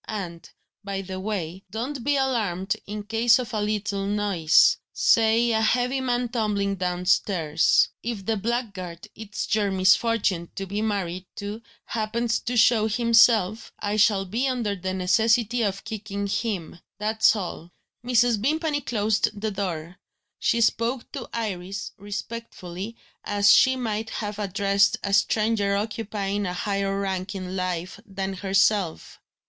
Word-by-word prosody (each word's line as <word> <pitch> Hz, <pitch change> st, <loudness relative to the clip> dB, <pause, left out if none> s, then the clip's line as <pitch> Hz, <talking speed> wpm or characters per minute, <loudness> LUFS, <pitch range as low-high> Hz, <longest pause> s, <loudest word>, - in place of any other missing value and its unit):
And, 180 Hz, -6 st, -6 dB, 0.3 s
by 195 Hz, -1 st, -4 dB
the 185 Hz, 0 st, -6 dB
way, 190 Hz, -3 st, -4 dB
don't 245 Hz, +4 st, -4 dB
be 285 Hz, +2 st, +2 dB
alarmed 210 Hz, -9 st, 0 dB
in 210 Hz, 0 st, -5 dB
case 225 Hz, +2 st, +3 dB
of 250 Hz, -3 st, -5 dB
a 215 Hz, -, 0 dB
little 205 Hz, -2 st, -1 dB
noise 200 Hz, -6 st, +4 dB
say 230 Hz, +1 st, +3 dB
a 220 Hz, -1 st, +2 dB
heavy 250 Hz, +4 st, +1 dB
man 245 Hz, -1 st, 0 dB
tumbling 205 Hz, -4 st, -1 dB
downstairs. 180 Hz, -3 st, +2 dB
If 220 Hz, -5 st, -4 dB
the 225 Hz, -, +1 dB
blackguard 200 Hz, -6 st, -4 dB
it's 215 Hz, -1 st, -5 dB
your 210 Hz, -2 st, +2 dB
misfortune 190 Hz, -1 st, +2 dB
to 195 Hz, -, -4 dB
be 200 Hz, +2 st, -3 dB
married 190 Hz, -4 st, -2 dB
to 205 Hz, +2 st, -6 dB, 0.2 s
happens 230 Hz, +1 st, -1 dB
to 245 Hz, +1 st, -3 dB
show 225 Hz, -1 st, +5 dB
himself, 225 Hz, -2 st, +3 dB
I 205 Hz, 0 st, -2 dB
shall 205 Hz, -2 st, +3 dB
be 230 Hz, +8 st, -1 dB
under 235 Hz, -6 st, -1 dB
the 185 Hz, 0 st, -4 dB
necessity 225 Hz, +5 st, +2 dB
of 195 Hz, -3 st, -1 dB
kicking 200 Hz, -2 st, -5 dB
him. 200 Hz, -5 st, -3 dB, 0.2 s
That's 220 Hz, +1 st, +3 dB
all." 175 Hz, -3 st, -6 dB, 0.3 s
Mrs. 240 Hz, -3 st, +3 dB
Vimpany 305 Hz, +3 st, 0 dB
closed 215 Hz, -3 st, 0 dB
the 215 Hz, +1 st, -2 dB
door. 180 Hz, -4 st, -4 dB, 0.4 s
She 235 Hz, -, +1 dB
spoke 230 Hz, +2 st, 0 dB
to 265 Hz, -4 st, -7 dB
Iris 195 Hz, -4 st, -4 dB
respectfully, 205 Hz, -1 st, -6 dB, 0.3 s
as 205 Hz, 0 st, +4 dB
she 260 Hz, 0 st, +5 dB
might 220 Hz, -3 st, -3 dB
have 210 Hz, -1 st, -4 dB
addressed 200 Hz, 0 st, +2 dB
a 200 Hz, -, -2 dB
stranger 210 Hz, 0 st, +2 dB
occupying 205 Hz, -1 st, -2 dB
a 180 Hz, -, -3 dB
higher 195 Hz, +1 st, -1 dB
rank 190 Hz, 0 st, -3 dB
in 185 Hz, -1 st, -5 dB
life 185 Hz, 0 st, -3 dB
than 195 Hz, -1 st, -4 dB
herself. 195 Hz, -1 st, 0 dB
205 Hz, 140 wpm, -25 LUFS, 195-230 Hz, 0.4 s, show